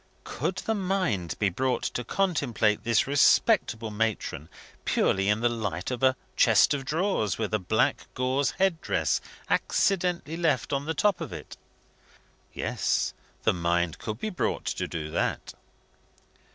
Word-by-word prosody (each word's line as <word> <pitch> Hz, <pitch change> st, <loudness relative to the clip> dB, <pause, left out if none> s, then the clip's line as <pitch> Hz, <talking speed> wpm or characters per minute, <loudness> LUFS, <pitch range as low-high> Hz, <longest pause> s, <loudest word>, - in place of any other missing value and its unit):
Could -, -, -3 dB
the 220 Hz, -, +1 dB
mind 185 Hz, -, -1 dB
be 100 Hz, -, +2 dB
brought 130 Hz, +7 st, -1 dB
to 120 Hz, -, -2 dB
contemplate 120 Hz, -, 0 dB
this 115 Hz, -1 st, +3 dB
respectable 135 Hz, -, +3 dB
matron 105 Hz, -8 st, -2 dB, 0.3 s
purely 95 Hz, +1 st, +1 dB
in 105 Hz, +2 st, +2 dB
the 120 Hz, -, +4 dB
light 115 Hz, -4 st, -3 dB
of 125 Hz, -, -3 dB
a 130 Hz, -1 st, +4 dB, 0.2 s
chest -, -, +5 dB
of 135 Hz, -2 st, -3 dB
drawers, 155 Hz, -, 0 dB
with 110 Hz, -1 st, -3 dB
a 110 Hz, -, +2 dB
black 95 Hz, +4 st, 0 dB
gauze 130 Hz, +2 st, +1 dB
held 190 Hz, -4 st, +2 dB
dress -, -, 0 dB, 0.3 s
accidentally 175 Hz, -4 st, +1 dB
left 165 Hz, -3 st, 0 dB
on 140 Hz, +1 st, -1 dB
the 160 Hz, +1 st, -2 dB
top 205 Hz, -3 st, +2 dB
of -, -, -5 dB
it? -, -, -8 dB, 1.0 s
Yes, -, -, -1 dB, 0.3 s
the -, -, +3 dB
mind 85 Hz, -1 st, 0 dB
could 110 Hz, 0 st, -4 dB
be 215 Hz, -, -3 dB
brought 180 Hz, -, -2 dB
to -, -, -2 dB
do 75 Hz, -2 st, -5 dB
that. -, -, -2 dB
125 Hz, 150 wpm, -27 LUFS, 105-165 Hz, 1.0 s, chest